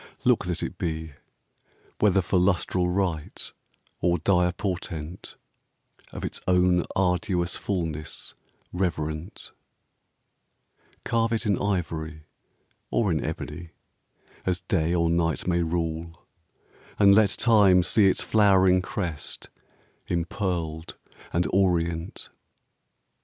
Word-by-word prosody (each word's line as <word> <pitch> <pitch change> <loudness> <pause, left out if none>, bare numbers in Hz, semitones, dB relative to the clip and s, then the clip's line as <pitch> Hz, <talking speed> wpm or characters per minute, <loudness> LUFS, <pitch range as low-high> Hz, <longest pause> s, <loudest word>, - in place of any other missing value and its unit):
Look - - +3
that - - -2
it - - -5
be, 80 -1 -3 0.9
Whether 95 -3 +3
for 90 +1 +1
lustral 90 -1 +1
rite 90 -5 -2 0.5
or 85 0 +2
dire 90 +1 +2
portent, 90 -3 -5 0.8
Of - - -5
its - - -5
own 90 -1 +3
arduous 90 -1 0
fulness 80 -6 -4 0.4
reverent: 85 -1 -3 1.5
Carve 115 -1 +1
it 115 +1 -1
in 100 -4 +1
ivory 80 -5 -2 0.7
or 105 -5 +1
in 80 -3 0
ebony, 85 -1 -6 0.7
As 90 -1 -1
Day 85 -2 0
or 85 -1 +2
Night 85 -1 0
may 85 -1 +2
rule; 80 0 -3 0.7
and 100 -1 +6
let 105 0 +5
Time 100 -5 +4
see 100 +3 +4
Its 95 - +1
flowering 95 -3 +4
crest 90 -5 -5 0.6
impearled 85 -2 -3 0.3
and 85 +1 +1
orient. 85 -3 0
90 Hz, 105 wpm, -26 LUFS, 85-95 Hz, 1.5 s, and